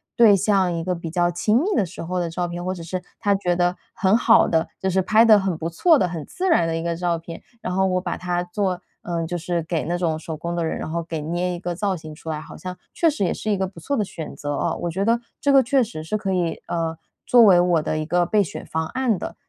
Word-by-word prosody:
对 225 -4 +7
象， 195 -2 +2
一 165 -1 -3
个 180 +1 -1
比 170 -1 -6
较 175 0 +2
亲 210 +6 +2
密 - - -1
的 200 - +2
时 175 +1 -8
候 180 +2 -2
的 170 -1 -1
照 175 +2 -2
片， 175 0 -5
或 185 - -1
者 180 - -8
是 180 +2 -4 0.2
她 205 -2 +2
觉 180 -3 0
得 175 0 +1 0.2
很 195 +3 +3
好 230 -1 +5
的， 160 0 +1
就 190 - -1
是 190 +1 +1
拍 215 +4 +5
得 220 -2 +8
很 190 -3 -1
不 165 +1 -3
错 320 - +4
的、 185 - +2
很 165 -4 -5
自 375 +1 -2
然 245 - +4
的 165 - -1
一 165 - -2
个 170 0 -1
照 170 0 0
片， 165 0 -9 0.2
然 180 - -3
后 190 0 +3
我 185 -1 +1
把 175 -2 -3
它 175 -1 -1
做 180 0 -2 0.2
呃， 170 -1 -2
就 175 - -3
是 175 0 -2
给 165 -1 -2
那 170 +3 -2
种 170 -3 0
手 160 0 -6
工 170 +3 -4
的 170 -1 -1
人， 160 - -2
然 - - -5
后 170 +1 -2
给 160 -1 -5
捏 175 +4 -2
一 175 - -5
个 175 -1 -4
造 195 +1 0
型 155 -2 -9
出 160 - -9
来。 155 -1 -4
好 - - -11
像 185 -1 -6 0.2
确 335 - +3
实 280 - -2
也 175 - 0
是 215 - -2
一 205 - +1
个 190 - 0
不 185 -2 -12
错 280 - -2
的 215 - +1
选 165 -5 -7
择 145 0 -4
哦。 - - -1
我 175 - -1
觉 190 +4 -1
得 230 +2 +3 0.2
这 280 - +2
个 270 - +8
确 265 +1 +3
实 200 -9 -6
是 185 +7 -2
可 195 -2 -2
以， 175 -3 -1
呃， 165 -1 -2 0.3
作 245 -1 +7
为 190 -5 +7
我 175 -2 +3
的 155 - -1
一 155 - -2
个 175 +2 +2
备 205 +4 +3
选 175 - -7
方 160 0 -2
案 255 -3 0
的。 - - -6
175 Hz, 310 characters per minute, -23 LUFS, 165-195 Hz, 0.3 s, 得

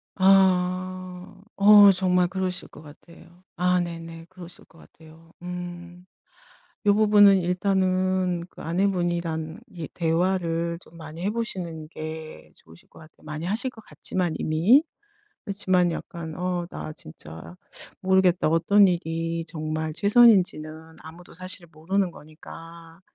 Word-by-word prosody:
아. 185 0 +1 0.2
어 205 0 +8
정말 180 -1 +2
그러실 185 0 -4
것 - - -15
같아요. 170 +4 -17
아 180 +1 +2
네네 165 -1 -6
그러실 180 -2 -13
것 165 - -23
같아요. 160 +1 -18
음. 175 0 -8 0.8
요 205 0 +4
부분은 205 -2 +6
일단은 185 -1 0
그 - - -15
아내분이랑 170 -2 -2
이 165 -4 -7
대화를 170 0 -1
좀 165 - -18
많이 160 +1 -9
해 205 - +1
보시는 175 -9 -5
게 155 -1 -8
좋으실 80 +1 -20
것 - - -17
같아요, 155 -1 -18
많이 155 +2 -6
하실 225 +7 -1
것 220 -3 -15
같지만 180 -4 -2
이미. 190 - +3 0.6
그렇지만 185 -3 +1
약간 165 -1 -7
"어 180 -1 -2
나 155 - -6
진짜 80 - -11 0.5
모르겠다." 190 -1 +3
어떤 180 +5 +4
일이 165 -1 -2
정말 155 -1 -4
최선인지는 175 -8 +3
아무도 170 +3 -13
사실 185 -1 -6
모르는 180 +4 -1
거니까. 165 +2 -13
175 Hz, 260 characters per minute, -25 LUFS, 165-185 Hz, 0.8 s, 어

